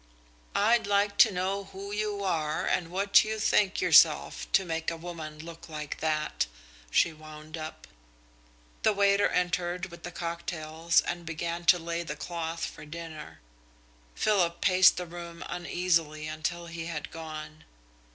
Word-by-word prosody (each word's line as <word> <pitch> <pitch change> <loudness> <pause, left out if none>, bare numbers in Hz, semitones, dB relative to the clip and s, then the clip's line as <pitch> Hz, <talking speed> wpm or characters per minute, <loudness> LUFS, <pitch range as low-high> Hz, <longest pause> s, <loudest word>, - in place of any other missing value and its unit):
"I'd 230 +2 +3
like 200 0 +1
to 220 - +8
know 190 +2 -2
who 195 +1 -8
you 210 -1 -2
are 155 -5 0
and 170 -2 0
what 195 +3 +4
you 220 0 -3
think 210 -2 +2
yourself - - +4
to 195 - +4
make 165 -1 -2
a 165 - -5
woman 160 -3 -7
look 165 +2 -10
like 150 -2 -6
that?" 155 - 0 0.4
she 165 - +3
wound 155 0 -10
up. 155 -1 -7 1.0
The 220 - +4
waiter 200 0 +3
entered 180 0 -1
with 170 - -11
the 175 - -6
cocktails 170 -1 -1
and 175 0 -4
began 170 +1 -4
to 180 - +7
lay 170 0 -3
the 160 -3 -5
cloth 165 +1 -4
for - - -9
dinner. 160 - -9 0.7
Philip 180 -5 +2
paced 185 -1 +6
the 180 - -3
room 170 0 -8
uneasily 165 -3 0
until 155 +3 -3
he 165 -1 -6
had 155 -3 -5
gone. 155 -1 -8
170 Hz, 150 wpm, -29 LUFS, 160-185 Hz, 1.0 s, to